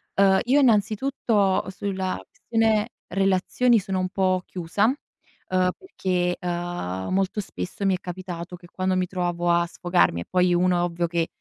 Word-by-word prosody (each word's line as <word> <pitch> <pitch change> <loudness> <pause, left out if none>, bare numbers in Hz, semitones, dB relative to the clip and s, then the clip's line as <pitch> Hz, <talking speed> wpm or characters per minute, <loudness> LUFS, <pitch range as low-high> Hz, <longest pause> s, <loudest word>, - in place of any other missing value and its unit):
Uhm, 195 -1 +5
io 260 +4 +3
innanzitutto 215 -3 +2
sulla 190 -1 -3
questione 225 -1 0 0.2
relazioni 195 +6 +2
sono 190 -1 -2
un 185 0 -1
po' 185 -1 +1
chiusa, 180 +3 -1
uhm, 185 -7 -2
perché, 180 - -1
uhm, 175 - -3
molto 195 +2 0
spesso 200 +1 -5
mi 195 - +3
è - - -6
capitato 180 -1 -6
che 175 0 -15
quando 185 0 0
mi 185 0 +1
trovavo 175 -1 -1
a 170 0 +2
sfogarmi 175 - +1
e - - -7
poi 180 -1 +2
uno 180 0 +3
è - - +1
ovvio 175 0 -1
che 170 -1 -1
185 Hz, 160 wpm, -24 LUFS, 175-200 Hz, 0.2 s, Uhm